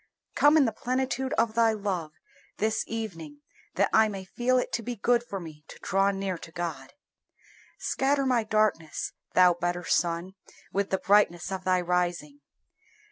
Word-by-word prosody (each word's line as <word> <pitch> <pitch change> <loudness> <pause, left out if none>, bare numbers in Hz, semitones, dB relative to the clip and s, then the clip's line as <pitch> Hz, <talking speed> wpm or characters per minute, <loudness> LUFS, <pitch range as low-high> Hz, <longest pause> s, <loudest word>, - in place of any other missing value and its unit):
Come 295 +2 +5
in 290 - +5
the 225 - +1
plenitude 260 +3 -2
of 225 -2 +1
Thy 225 -1 +3
love 190 -7 -3 0.5
this 220 +1 0
evening, 165 -10 -6 0.3
that 200 - +3
I 220 0 +6
may 195 -2 -6
feel 245 +6 0
it 250 - -1
to 230 - 0
be 245 +2 -5
good 240 +3 +2
for 200 -5 -6
me 155 -3 -11
to - - -12
draw 195 +1 +2
near 195 -3 -3
to 165 - -11
God! 160 -6 -5 0.8
Scatter 275 +1 0
my 250 -3 +2
darkness, 215 -7 0 0.2
Thou 180 -1 +6
better 175 +1 -2
Sun, 170 +2 0 0.4
with 200 0 0
the 190 - +1
brightness 195 -3 +2
of 190 -1 -4
Thy 185 -1 +2
rising. 175 -5 -1
195 Hz, 165 wpm, -27 LUFS, 175-225 Hz, 0.8 s, I